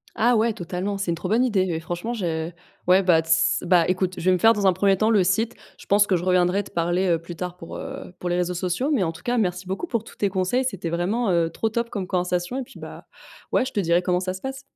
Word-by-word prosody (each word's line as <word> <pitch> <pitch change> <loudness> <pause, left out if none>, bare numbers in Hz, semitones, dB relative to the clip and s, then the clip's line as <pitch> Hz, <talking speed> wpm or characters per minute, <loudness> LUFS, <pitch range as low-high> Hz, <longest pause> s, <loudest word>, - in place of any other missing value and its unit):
Ah 240 +2 +3
ouais, 225 +1 +2
totalement! 185 +2 -4
C'est 195 -3 -1
une - - 0
trop 175 +2 -5
bonne 230 +4 +3
idée, 200 -7 +1
oui, 160 -2 -1
franchement 175 +8 -4
je 165 -7 -2 0.4
ouais, 185 +2 +5
bah, 170 -3 +4
tss, 160 0 +2
bah, 175 -3 +5
écoute, 185 0 0
je - - -6
vais 185 - +5
me 185 - +3
faire 225 +3 +6
dans 205 -2 -1
un 190 - +5
1er 195 +1 +2
temps, 215 +2 +2
le 205 -4 +4
site. 220 +6 0 0.2
Je - - -14
pense 205 +1 +4
que 190 - +2
je 175 - -2
reviendrai 185 +2 +2
te - - -14
parler, 175 +3 0
heu, 170 -2 +2
plus 170 +1 -9
tard 180 +1 -5
pour, 165 - -9
heu, - - -8
pour 180 - -3
les 175 - 0
réseaux 180 0 0
sociaux 180 - -1
mais 235 -9 +2
en 165 - -1
tout 165 - -13
cas, 245 0 0
merci 180 -3 -1
beaucoup 190 - -3
pour 230 -7 -2
tous - - -14
tes 200 - 0
conseils. 190 +7 0
C'était 195 -9 -3
vraiment, 195 +7 0
heu, 170 -2 +2
trop 220 +6 -2
top 235 +1 -2
comme 195 -4 -4
conversation 180 +4 -1
et - - -3
puis, - - -15
bah, - - -10 0.5
ouais, - - +2
je - - -6
te - - 0
dirai 170 -2 +2
comment 180 0 +1
ça 185 0 -3
se 190 - -9
passe! 265 0 -5
185 Hz, 285 wpm, -24 LUFS, 175-210 Hz, 0.5 s, faire